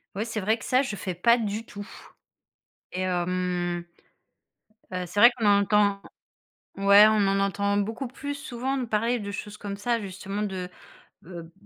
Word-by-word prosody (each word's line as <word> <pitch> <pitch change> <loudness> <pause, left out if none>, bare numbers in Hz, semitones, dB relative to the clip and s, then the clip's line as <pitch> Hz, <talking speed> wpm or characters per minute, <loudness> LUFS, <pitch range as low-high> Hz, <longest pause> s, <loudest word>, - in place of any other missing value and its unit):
Oui, 210 +3 -2
c'est 225 -1 -4
vrai 215 +4 +1
que - - -10
ça, 255 +1 +3
je 255 -7 -3
fais 190 -2 -4
pas 235 +8 +4
du 220 -1 -3
tout 205 -1 -9 1.1
et 185 - -2
hem, 180 -1 -1 1.1
heu, 180 0 -2
c'est 190 +4 -2
vrai 240 +3 +9
qu'on 225 -3 -1
en 200 0 +5
entend 200 0 +2 0.8
ouais, 200 +1 +7
on 215 -2 +3
en 195 0 +1
entend 200 +1 0
beaucoup 225 +6 -2
plus 285 +3 -6
souvent 270 -2 -4
de 255 - -2
parler 230 +2 0
de 200 -2 -6
choses 210 +1 -7
comme 200 -1 -5
ça, 230 +3 -1
justement, 195 +1 -5
de, 190 -3 -4 0.6
heu, 170 -2 -9
205 Hz, 175 wpm, -26 LUFS, 190-225 Hz, 1.1 s, vrai